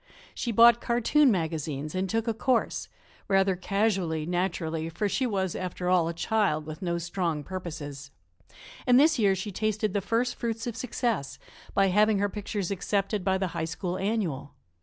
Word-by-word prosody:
She 240 - -3
bought 235 +2 +7
cartoon 250 +5 +3
magazines 155 - -2
and 185 +1 -1
took 225 +3 -1
a 230 - +1
course 245 +2 0 0.4
rather 195 -1 +3
casually, 185 -5 0
naturally, 165 -2 -2
for 205 +6 -1
she 255 +6 0
was, 190 -5 -1
after 180 0 -3
all, 180 -3 +3
a 170 - -2
child 180 -5 0
with 155 +3 -8
no 170 -2 -1
strong 170 -3 -2
purposes 145 -6 -6 0.8
and 250 0 +7
this 305 -1 +4
year 200 -3 +4
she 190 +3 -4
tasted 215 0 -1
the 200 - 0
first 230 +5 0
fruits 230 -1 -3
of 240 -3 -4
success 235 - -2 0.4
by 195 -1 +4
having 210 +2 +4
her 205 +1 +1
pictures 200 -1 -4
accepted 200 +1 -1
by 190 +1 +2
the 190 -1 -1
High - - -2
School 180 +2 -4
Annual. 185 -9 -2
195 Hz, 170 wpm, -27 LUFS, 170-220 Hz, 0.8 s, bought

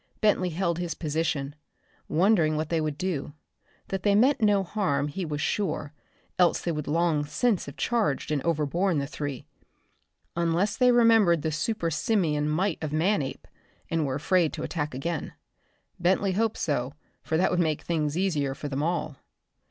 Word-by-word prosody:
Bentley 200 -4 +2
held 170 0 -1
his 175 -2 -3
position, 150 -3 -2 0.5
wondering 165 -3 +3
what 155 0 -2
they 165 -2 +1
would 155 -2 -2
do. 155 -6 -3 0.6
That 195 -1 -2
they 200 0 +3
meant 255 +5 +4
no 205 -2 +4
harm 150 -8 -1
he 180 +5 -4
was 150 -2 -3
sure, 170 -5 -1 0.5
else 180 -1 +4
they 170 - -2
would 150 -2 -4
long 160 -1 +1
since 200 +6 0
have 140 - -9
charged 220 - 0
and 145 -2 0
overborne 170 +3 0
the 140 - 0
three 145 -2 -5 0.9
unless 170 +4 +1
they 250 -1 +4
remembered 225 -9 +5
the 160 - 0
super 165 +3 -1
simian 150 -4 +1
might 175 +3 0
of 155 - -3
Manape 155 -2 0 0.4
and 165 -1 +1
were 135 -2 -1
afraid 170 +2 +2
to - - -5
attack 150 -5 -3
again. 165 +3 -3 0.7
Bentley 190 +3 +2
hoped 220 +3 0
so, 140 -2 -1 0.3
for 160 - -1
that 180 - +2
would 180 - +1
make 155 -3 0
things 155 -2 -1
easier 150 -8 0
for 145 0 -6
them 140 0 -2
all. 155 -3 -2
165 Hz, 165 wpm, -27 LUFS, 150-190 Hz, 0.9 s, remembered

